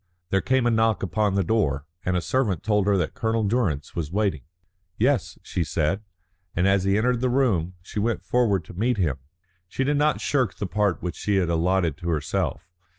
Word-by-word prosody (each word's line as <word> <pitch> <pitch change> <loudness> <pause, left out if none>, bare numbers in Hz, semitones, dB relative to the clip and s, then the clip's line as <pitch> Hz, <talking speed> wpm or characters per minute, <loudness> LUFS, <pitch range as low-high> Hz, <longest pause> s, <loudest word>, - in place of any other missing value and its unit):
There 95 - +3
came 130 -1 +1
a 120 - +3
knock 110 -3 +2
upon 100 +2 0
the 100 - +2
door, 75 -9 0 0.2
and 90 0 0
a - - 0
servant 110 -6 0
told 105 -2 +2
her 100 -1 +4
that 85 -4 -1
Colonel 110 0 0
Durrance 100 - -1
was 80 -3 -3
waiting. 100 -7 0 0.6
"Yes," - - +1
she 85 - -2
said, 80 +5 0 0.5
and 90 +2 +2
as 95 -1 +3
he 95 +1 +3
entered 120 +2 +1
the 130 - +2
room 100 -10 +1
she 105 - -5
went 115 +2 -1
forward 105 -9 +2
to - - -11
meet 115 +6 0
him. 80 -10 0 0.5
She 130 - -2
did 145 +2 +1
not 150 +1 +2
shirk 130 -9 0
the 105 - -3
part 100 -1 0
which 90 -1 -3
she 105 - 0
had 90 -3 +2
allotted 85 -2 +1
to 85 - -4
herself. 75 -4 -1
100 Hz, 205 wpm, -25 LUFS, 85-115 Hz, 0.6 s, her